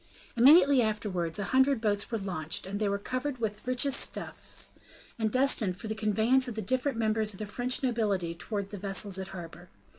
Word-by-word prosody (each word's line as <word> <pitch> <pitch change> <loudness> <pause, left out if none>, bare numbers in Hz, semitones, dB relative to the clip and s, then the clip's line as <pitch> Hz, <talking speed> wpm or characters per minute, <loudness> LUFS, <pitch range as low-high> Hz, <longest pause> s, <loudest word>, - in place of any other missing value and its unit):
Immediately 275 +2 +7
afterwards 205 -7 -2
a 205 - -2
hundred 265 0 +4
boats 210 -2 0
were 230 - -1
launched; 190 +1 -4
they 210 -2 +1
were 200 - 0
covered 255 +6 -3
with 215 -2 -3
the 250 - -6
richest 265 +2 +2
stuffs, - - -4 0.5
and 220 -1 +1
destined 255 -8 +2
for 220 - -7
the 220 - -2
conveyance 220 +5 +2
of 240 - -5
the 220 - -3
different 260 +4 0
members 215 -1 +1
of - - -10
the 215 - -3
French 245 +6 0
nobility 205 -9 0
towards 200 +3 -5
the 205 - -6
vessels 195 0 -1
at 190 0 -7
anchor. 175 0 -10
215 Hz, 190 wpm, -29 LUFS, 195-250 Hz, 0.5 s, Immediately